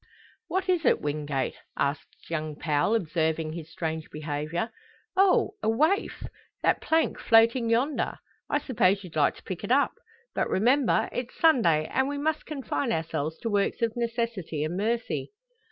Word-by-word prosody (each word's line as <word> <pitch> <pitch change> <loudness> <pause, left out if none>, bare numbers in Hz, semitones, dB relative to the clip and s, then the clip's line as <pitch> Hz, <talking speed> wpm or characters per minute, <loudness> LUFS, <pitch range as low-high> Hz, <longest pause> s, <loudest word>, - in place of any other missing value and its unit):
"What 375 +1 -1
is 360 -3 +2
it, - - +4
Wingate?" 145 -2 -2 0.2
asks 140 +2 -3
young 155 -2 -2
Powell, 150 +7 +1
observing 160 -4 0
his 160 -2 -7
strange 160 -1 -4
behaviour. 155 +6 -3 0.4
"Oh! 385 -1 +4
a - - +1
waif 315 - +1 0.4
that - - +3
plank 320 0 +1
floating 230 +1 +4
yonder! 255 +6 +1 0.3
I - - +2
suppose 200 -7 +2
you'd 180 -3 -11
like 150 -2 +3
to - - -16
pick 185 -2 -6
it - - -3
up! 280 +2 +4 0.4
But - - 0
remember! 235 +1 +3
it's 245 0 -5
Sunday, 195 - +4
and 265 +11 0
we 285 0 -3
must 310 +2 -1
confine 270 - -2
ourselves 160 -1 -2
to 230 - -2
works 205 +3 +1
of 225 -1 0
necessity 230 -10 -2
and 155 +3 -2
mercy." 230 - -2
205 Hz, 155 wpm, -27 LUFS, 155-255 Hz, 0.4 s, it